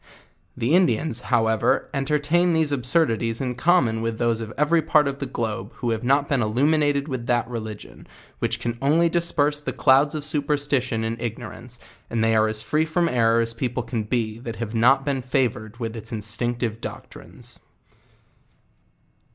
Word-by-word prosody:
The 120 +7 0
Indians, 160 -8 +2
however, 110 -2 +2
entertain 150 +5 +1
these 160 -2 +2
absurdities 120 -4 +1
in 125 -2 -2
com 170 +5 +3
mon 110 -1 -2
with 115 -1 -2
those 115 -1 0
of 110 -1 -6
every 155 +3 +3
part 150 -1 +3
of 140 0 -4
the 140 - -3
globe 110 -2 -4
who 120 -2 -2
have 110 +1 -2
not 140 +3 +2
been 140 -3 +1
illuminated 140 +5 +1
with 130 -5 -5
tbat 120 -1 +2
religion, 110 -3 -8 0.3
which - - -1
can 120 0 -4
only 160 +5 +3
disperse 150 -4 +1
the - - -3
clouds 140 +3 +3
of 150 -1 -4
superstition 145 -6 0
and 115 +1 -3
ignorance, 120 +1 -6 0.3
and 115 -1 0
they 115 0 +3
are 110 0 +4
as 110 0 -3
free 155 +1 +1
from 170 +2 +1
error 115 -4 +3
as 115 0 -1
people 125 +1 -3
can 115 -1 -3
be, 110 0 -2
that 115 -2 -6
have 115 -1 -5
not 130 +4 +4
been 140 -2 -1
fovoured 120 -4 -1
with 115 -2 -4
its 110 0 -7
instructive 115 +1 -2
doctrines. - - -10
125 Hz, 170 wpm, -23 LUFS, 115-145 Hz, 0.3 s, are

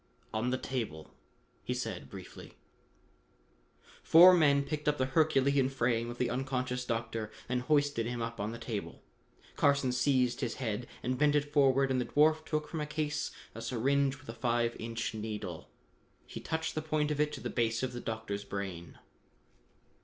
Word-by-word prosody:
"On 110 +3 0
the 130 - 0
table," 115 - -5 0.5
he 125 - -2
said 110 -7 -4
briefly. 95 -2 -10 1.5
Four 180 +3 +9
men 145 -5 +4
picked 150 +1 -4
up 150 0 +3
the 130 - +1
herculean 140 -1 +3
frame 120 -3 0
of 120 - -7
the 125 - +1
unconscious 125 -1 -2
doctor 115 -2 -3 0.2
and 125 0 0
hoisted 145 -4 +1
him 120 0 -3
up 115 0 -4
on 105 +2 -2
the 115 - -6
table. 115 -3 -5 0.5
Carson 140 -2 +3
seized 125 -1 +2
his 120 -4 -2
head 120 -2 -3 0.2
and 125 +1 -1
bent 150 0 +4
it 145 0 0
forward 135 -2 +4
and 130 -1 +1
the - - -2
dwarf 155 +1 +3
took 155 -1 -2
from 160 - -4
a 150 - -3
case 150 0 -2 0.2
a 115 - -8
syringe 135 +4 +1
with 130 - -18
a 115 - -5
five 120 -1 0
inch 115 0 -3
needle. 105 -6 -5 0.6
He - - -8
touched 160 0 -2
the 155 - -2
point 155 -1 0
of 150 - -2
it 150 0 +1
to - - -5
the - - -4
base 115 0 0
of 130 - -2
the 120 - -5
doctor's 110 -3 -4
brain. 95 -4 -6
125 Hz, 175 wpm, -32 LUFS, 115-145 Hz, 1.5 s, Four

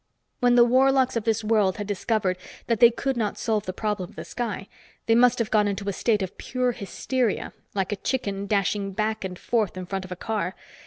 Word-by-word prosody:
When 245 0 +4
the 240 - +8
warlocks 260 +1 +3
of 230 - -1
this 225 -1 +1
world 210 -4 +2
had 205 - -3
discovered 200 -2 0 0.3
that 230 -3 0
they 235 - +9
could 265 +3 -2
not 215 -4 -1
solve 215 -4 -1
the - - 0
problem 200 -2 -2
of - - -18
the - - -7
sky, 215 -5 -4 0.4
they 225 - +3
must 245 +1 +5
have 230 -2 -1
gone 210 -1 +4
into 200 0 -3
a 200 - 0
state 210 0 +1
of 185 - -7
pure 250 0 0
hysteria, 240 +2 -2 0.2
like 195 0 -1
a - - +1
chicken 200 -5 -2
dashing 200 0 0
back 215 +1 -1
and 185 -1 -5
forth 215 -4 0
in 185 - -5
front 195 +1 -3
of 185 - -13
a - - -3
car. 195 -2 -2
215 Hz, 220 wpm, -25 LUFS, 195-235 Hz, 0.4 s, they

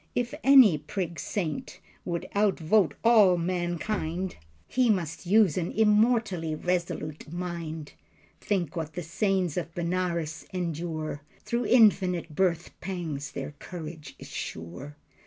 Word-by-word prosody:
If 245 +2 -1
any 260 - +7
prig 170 +2 -4
saint 165 -8 -3 0.3
would 170 -2 -3
outvote 200 -4 +3
all 215 -6 +6
mankind 175 +1 -2 0.3
He 250 -1 +2
must 175 -3 -1
use 195 -4 +4
an 175 - -2
immortally 210 -6 +2
resolute 160 -3 -3
mind. 170 -3 -5 0.5
Think 185 -6 -1
what 160 -2 -4
the 175 - -4
saints 185 0 0
of 170 -1 -4
Benares 170 -2 -2
endure, 165 -4 -3 0.2
Through 235 0 -1
infinite 185 -8 +4
birthpangs 170 -3 -2
their - - -5
courage 160 -4 -8
is - - -11
sure. 90 - -7
175 Hz, 115 wpm, -28 LUFS, 160-195 Hz, 0.5 s, any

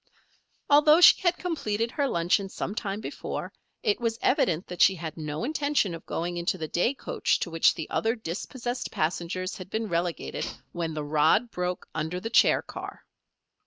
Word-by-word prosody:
Although 300 +2 +6
she - - +8
had 350 -1 +2
completed 230 -10 -2
her 285 0 0
luncheon 180 0 +1
some 195 - -4
time 205 -1 -3
before, - - -5 0.3
it 210 - +1
was 230 -1 0
evident 180 - +1
that 180 - -5
she 190 - +6
had 160 -3 -6
no 155 +2 -4
intention 285 - 0
of 165 - -9
going 175 +1 -3
into 175 +2 -1
the 160 -2 -4
day 205 - +1
coach - - 0
to 170 - -3
which 165 0 +4
the 160 - -5
other 225 +2 +1
dispossessed 245 - -4
passengers 175 +3 -2
had 185 -1 -9
been 220 0 -2
relegated 170 0 -2 0.2
when 165 -2 -3
the 150 - -3
rod 155 +11 +3
broke 180 0 -3
under 160 +3 -3
the 225 +5 -5
chair - - +5
car. - - -9
185 Hz, 175 wpm, -27 LUFS, 170-235 Hz, 0.3 s, she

